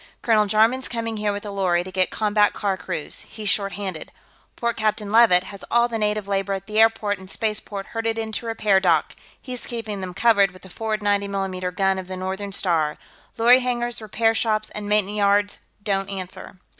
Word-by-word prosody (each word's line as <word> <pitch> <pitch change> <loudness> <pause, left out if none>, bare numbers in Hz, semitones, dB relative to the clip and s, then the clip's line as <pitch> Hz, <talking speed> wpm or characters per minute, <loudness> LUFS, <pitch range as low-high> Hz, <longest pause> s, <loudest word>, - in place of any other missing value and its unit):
Colonel 215 -3 +3
Jarman's 225 +5 +3
coming 230 -2 -3
here 210 -1 0
with 205 +1 -5
a 205 - -5
lorry 180 -3 +1
to 185 - -9
get 185 0 +1
combat 210 -1 +2
car 200 -2 -1
crews; 180 -4 -5
he's 215 -2 -6
short 200 0 +1
handed. 190 -5 -5 0.4
Port 235 0 -1
Captain 215 -1 -1
Leavitt 220 -6 +6
has 200 +1 -10
all 235 0 +4
the 230 -2 -3
native 210 -1 0
labor 195 0 0
at 195 0 -4
the 215 +1 -1
airport 220 -3 +3
and 190 0 -10
spaceport 210 -2 -2
herded 225 0 -2
into 220 +1 -3
a - - -2
repair 210 -3 +3
dock; 170 -5 +2 0.2
he's 250 -2 -6
keeping 220 -4 -4
them 180 -1 -6
covered 200 -3 +4
with 185 - -16
the 190 - -12
forward 215 0 -3
90 200 -1 +1
mm 185 -2 -3
gun 195 0 +2
of 185 - -7
the 185 0 -6
Northern 190 +2 -4
Star. 165 -6 0 0.4
Lorry 245 +3 +6
hangars, 240 -2 -2
repair 225 +1 +1
shops 215 -1 0
and 205 -1 -6
maintenance 210 0 +2
yards 205 0 +2 0.2
don't 195 -2 -1
answer." 185 -1 -7
205 Hz, 200 wpm, -23 LUFS, 195-220 Hz, 0.4 s, Leavitt